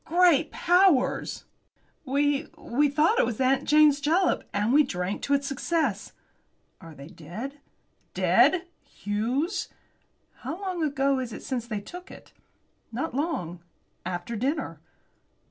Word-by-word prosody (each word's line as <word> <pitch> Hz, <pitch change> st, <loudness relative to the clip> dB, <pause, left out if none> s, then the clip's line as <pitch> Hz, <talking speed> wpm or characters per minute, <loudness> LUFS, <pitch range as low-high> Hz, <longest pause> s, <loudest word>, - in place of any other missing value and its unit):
"Great 335 Hz, -3 st, +4 dB
powers!" 355 Hz, -6 st, +2 dB, 0.6 s
"We 285 Hz, +2 st, +1 dB
we 290 Hz, +4 st, +1 dB
thought 315 Hz, -, +2 dB
it -, -, +4 dB
was 220 Hz, -, -4 dB
'Aunt 265 Hz, +1 st, +2 dB
Jane's 300 Hz, -1 st, +5 dB
Jalap,' 335 Hz, +5 st, +1 dB
and 210 Hz, +4 st, 0 dB
we 300 Hz, -, +7 dB
drank 190 Hz, -7 st, -3 dB
to 285 Hz, -, +1 dB
its 280 Hz, 0 st, -1 dB
success." 275 Hz, -, -1 dB, 0.7 s
"Are 165 Hz, -2 st, -12 dB
they 140 Hz, -, -11 dB
dead?" 215 Hz, -, -8 dB, 0.6 s
"Dead! 370 Hz, -1 st, +4 dB, 0.2 s
Hughes!" 245 Hz, -, -2 dB, 0.7 s
"How 340 Hz, -, -6 dB
long 370 Hz, -3 st, -3 dB
ago 275 Hz, -3 st, +1 dB
is 250 Hz, -2 st, -4 dB
it -, -, -8 dB
since 245 Hz, -3 st, -3 dB
they 215 Hz, -3 st, -3 dB
took 360 Hz, -, -10 dB
it?" -, -, -14 dB, 0.6 s
"Not 260 Hz, +8 st, -3 dB
long. 250 Hz, -, -2 dB, 0.4 s
After 180 Hz, +6 st, -4 dB
dinner." 260 Hz, -, -2 dB
275 Hz, 130 wpm, -26 LUFS, 225-320 Hz, 0.7 s, we